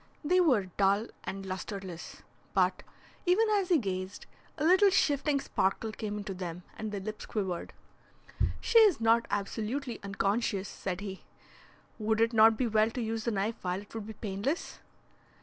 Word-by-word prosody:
They 360 +5 +3
were 255 - +3
dull 200 +3 +3 0.2
and 195 0 -5
lustreless, 190 -2 -6 0.3
but, - - +2 0.5
even 380 +6 +5
as 400 -3 +2
he 350 - +5
gazed, 190 -5 -4 0.3
a 300 - -2
little 380 +4 +6
shifting 290 -5 +2
sparkle 215 -2 -1
came 210 -1 -4
into 205 -1 -5
them, 180 -1 -6
and 220 -1 -5
the 205 - -3
lips 215 +2 -6
quivered. 190 -6 -3 0.9
"She 460 0 +5
is 415 - +6
not 230 +1 +3
absolutely 230 +5 -3
unconscious," 200 0 -1
said 185 -1 -4
he. 195 -2 -6 0.8
"Would 220 0 +1
it 230 +1 +3
not 220 0 +6
be 255 - +1
well 220 -1 +3
to 240 - -5
use 225 -1 -2
the 235 - +1
knife 210 +2 -1
while 180 0 -1
it 205 - -19
would 220 -2 -5
be 220 - -6
painless?" 210 - -3
215 Hz, 165 wpm, -30 LUFS, 195-245 Hz, 0.9 s, little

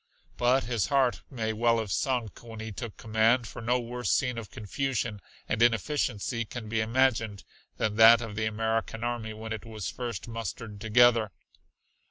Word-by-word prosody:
But 125 +2 +3
his 115 -4 -1
heart 135 -3 +2
may 110 -5 -2
well 115 +1 +2
have 110 -4 -3
sunk 120 +2 -1
when 115 -2 -10
he 110 0 -5
took 115 0 -7
command, 115 +2 +2
for - - -8
no 120 +2 +1
worse 120 +1 -3
scene 125 -3 +1
of 110 - -9
confusion 115 -1 -3 0.3
and - - -1
inefficiency 115 -1 +1
can 115 0 -7
be 110 +1 0
imagined 115 -3 +1 0.3
than 105 0 -1
that 115 +1 +9
of 115 -3 -6
the 110 +1 -1
American 110 +1 -2
army 120 -2 -3
when 110 +1 -5
it 110 - -6
was 110 -5 -5
first 120 -6 -5
mustered 115 -2 -6
together. 115 0 +4
115 Hz, 170 wpm, -28 LUFS, 110-120 Hz, 0.3 s, that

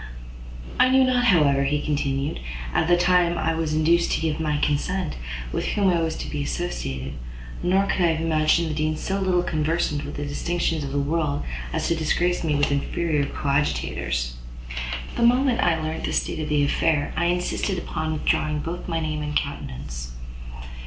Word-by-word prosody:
"I 255 - +6
knew 265 0 +5
not, 250 -1 +2
however," 145 - +4
he 145 +2 +1
continued, 140 -1 -1 0.3
"at - - +2
the 175 0 +5
time 175 -1 +3
I 165 - +1
was 160 -1 -1
induced 170 +2 +3
to - - +1
give 160 -1 -1
my 150 -2 0
consent, 160 +5 0 0.4
with - - -1
whom 200 -2 +2
I 170 -2 +2
was 160 -1 -1
to - - -5
be 145 - -3
associated; 70 - -3 0.5
nor 190 +2 +3
could 190 - 0
I 170 -2 +4
have 160 - -3
imagined 160 +1 +2
the - - -2
Dean 155 0 0
so 195 +4 -2
little 185 -2 +2
conversant 155 -2 0
with - - -6
the 145 - -3
distinctions 165 +2 -1
of 140 - -4
the 140 - -1
world, 145 0 0 0.3
as - - -1
to 170 - +2
disgrace 175 +3 +1
me 155 -3 +1
with 145 0 +2
inferior 145 +1 0
coadjutors: 65 - -1 0.8
but - - -9
the 235 - +7
moment 255 0 +3
I 165 -2 +3
learnt 155 +1 -3
the - - -2
state - - -1
of 155 - -3
the 150 -1 +3
affair, 145 0 +1
I 170 - +1
insisted 180 +2 0
upon 160 -2 -3
withdrawing 155 0 0
both 170 +3 -5
my 165 -2 -1
name 155 -1 -2
and 150 0 -4
countenance." 65 -2 -4
155 Hz, 185 wpm, -24 LUFS, 145-175 Hz, 0.8 s, the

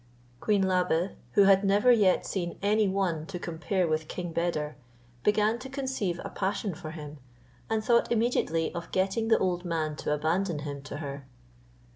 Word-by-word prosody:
Queen 205 - +2
Labe, 180 -1 +1 0.2
who 200 - +6
had 195 0 +5
never 205 +5 +4
yet 205 -6 +4
seen 175 -3 -3
any 210 +1 +3
one 190 -5 0
to 190 - -5
compare 175 +2 -1
with 155 0 -1
King 175 0 -5
Beder, 155 -3 -1 0.5
began 210 - +2
to 265 +2 -8
conceive 260 -10 -2
a - - -4
passion 200 0 -2
for 155 0 -8
him, 150 -2 -8 0.5
and 220 -1 0
thought 235 0 +3
immediately 220 -9 +1
of 170 -1 -6
getting 195 +4 0
the 225 - +5
old 180 -1 0
man 160 -3 -1
to - - -3
abandon 160 +4 0
him 140 -1 -5
to 145 - -7
her. 140 -2 -6
185 Hz, 170 wpm, -28 LUFS, 160-205 Hz, 0.5 s, who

